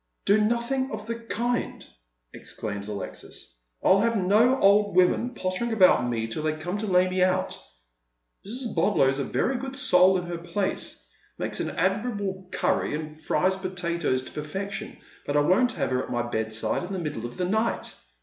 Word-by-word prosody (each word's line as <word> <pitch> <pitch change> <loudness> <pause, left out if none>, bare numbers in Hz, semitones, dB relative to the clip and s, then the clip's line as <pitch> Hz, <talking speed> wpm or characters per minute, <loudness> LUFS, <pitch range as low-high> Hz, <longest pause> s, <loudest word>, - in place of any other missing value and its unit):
" - - -50
Do 205 +2 +4
nothing 240 +4 0
of 215 -1 -6
the 230 - -2
kind," 230 +1 -3 0.5
exclaims 100 0 -5
Alexis. 100 -10 -7
" - - -38
I'll 195 - +5
have 230 +2 +2
no 215 +8 +4
old 205 0 +4
women 185 +7 +3
pottering 185 +6 -2
about 185 - +5
me 115 -2 -1
till 115 +6 -3
they 155 0 0
come 175 +6 -4
to 215 - -3
lay 180 -1 +4
me 185 0 -1
out. 185 0 +1 0.9
Mrs. 240 +4 -2
Bodlow's 135 -9 +3
a - - 0
very 260 - 0
good 270 0 -5
soul 190 -8 +5
in 180 - -4
her 175 -1 -5
place 170 - -3 0.2
— - - -35
makes - - -3
an - - -1
admirable 195 0 -1
curry, - - 0
and 155 0 -7
fries 190 +1 +2
potatoes 170 -8 -1
to - - -10
perfection; 195 +7 -5 0.3
but 145 - +1
I - - +5
won't 195 +11 +3
have - - -2
her 125 0 +1
at - - -7
my 120 0 -1
bedside 110 -2 -2
m 180 +2 -5
the - - -2
middle 150 -9 -4
of 120 - -12
the 180 - 0
night. 220 +5 -1
185 Hz, 190 wpm, -26 LUFS, 150-215 Hz, 0.9 s, I'll